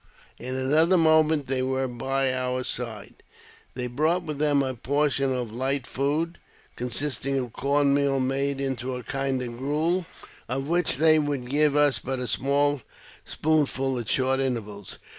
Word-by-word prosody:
In 130 +2 -5
another 155 +7 +3
moment 160 -2 +4
they 130 0 -1
were 130 0 -1
by 135 +2 -1
our 130 0 -1
side. 115 -4 -4 0.5
They 125 -1 -3
brought 155 +8 0
with 150 -3 -5
them 145 -2 +3
a 130 -1 -2
portion 135 +2 0
of 125 -3 -3
light 130 +3 -1
food, 150 +6 -2 0.4
con 125 +1 -4
sisting 135 +1 0
of 125 -3 -5
corn 140 +1 +2
meal 140 -1 +2
made 135 +1 -1
into 130 -2 -3
a 125 - -6
kind 135 +1 -2
of 120 -1 -7
gruel, 160 +6 0 0.4
of 135 +2 -2
which 170 -4 +2
they 155 +1 +5
would 145 -4 -2
give 145 +2 +2
us 145 -6 +4
but 130 +4 -3
a 125 - -3
small 140 +2 +1 0.4
spoonful 135 -4 0
at 115 - -5
short 130 0 +2
intervals. 105 -7 -4
135 Hz, 160 wpm, -26 LUFS, 130-145 Hz, 0.5 s, they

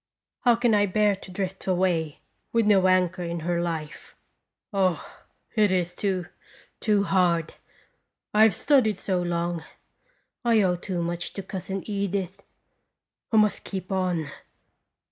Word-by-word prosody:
How 240 -3 +4
can 235 -1 +2
I 205 -1 +4
bear 210 +1 +2
to 195 - -11
drift 190 +1 -4
away 175 -4 0 0.3
with 230 -1 +2
no 195 -3 +5
anchor 185 0 +2
in 170 -1 -3
her 170 +1 0
life? 160 -3 -5 0.6
Oh, 190 -3 +1 0.5
it 210 -4 +3
is 180 -1 0
too, 185 -1 -1 0.5
too 210 -2 +2
hard. 175 -4 +1 0.8
I 210 - +4
have 220 -4 +6
studied 255 -9 +3
so 185 -2 -1
long; 170 -1 -2 0.8
I 230 -3 +4
owe 180 -2 +2
too 175 -1 -3
much 175 +1 -3
to 195 - -6
Cousin 190 0 -5
Edith. 200 -2 -3 0.9
I 225 - +3
must 210 -1 +3
keep 190 -2 -6
on. 180 -5 -1
185 Hz, 140 wpm, -26 LUFS, 175-205 Hz, 0.9 s, have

